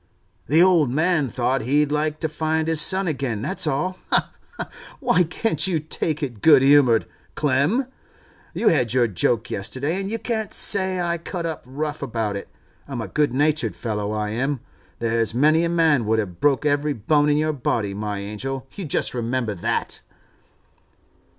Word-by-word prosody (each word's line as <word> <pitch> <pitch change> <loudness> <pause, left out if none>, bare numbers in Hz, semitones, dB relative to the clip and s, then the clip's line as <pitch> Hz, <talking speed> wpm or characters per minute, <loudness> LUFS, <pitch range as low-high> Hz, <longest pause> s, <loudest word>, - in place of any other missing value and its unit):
'The 160 +5 +5
old 170 -7 +4
man 155 +1 +1
thought 130 +3 -1
he'd 145 +5 +1
like 150 +1 -1
to 160 - 0
find 155 +1 -1
his 160 -2 +3
son 190 +3 +5
again, 135 -8 -2
that's 190 -3 -1
all. 155 +6 -1
Ha, - - +2 0.3
ha! - - -4 0.3
Why 240 -9 +2
can't 170 -1 +1
you 175 -4 0
take 155 0 -3
it 120 -7 -5
good 145 -4 +6
humoured, 135 -5 +5 0.3
Clem? 150 - +1 0.7
You 230 - +3
had 125 -6 +1
your 125 -2 +4
joke 115 +3 0
yesterday, 140 - -3
and 195 - -4
you 225 - -1
can't 225 -2 -3
say 190 -2 +2
I 170 -1 -1
cut 170 +1 -5
up 160 -2 -4
rough 150 +3 -4
about 110 -3 -2
it. 100 - -7 0.4
I'm 135 -4 -5
a 115 - -4
good 150 -3 0
natured 150 +3 0
fellow, 105 -3 -3
I 105 -1 -2
am. 130 +4 -2 0.4
There's 115 -1 -1
many 155 +5 +4
a 170 - 0
man 160 -9 +2
would 110 +1 +2
have 90 -6 -3
broke 145 0 +2
every 145 0 +1
bone 145 +6 +1
in 145 - +2
your 155 0 0
body, 115 -7 -2
my 105 0 -4
angel, 115 +7 -5
you 195 - -6
just 145 - 0
remember 120 -2 -2
that! 90 - -3
145 Hz, 175 wpm, -22 LUFS, 120-160 Hz, 0.7 s, good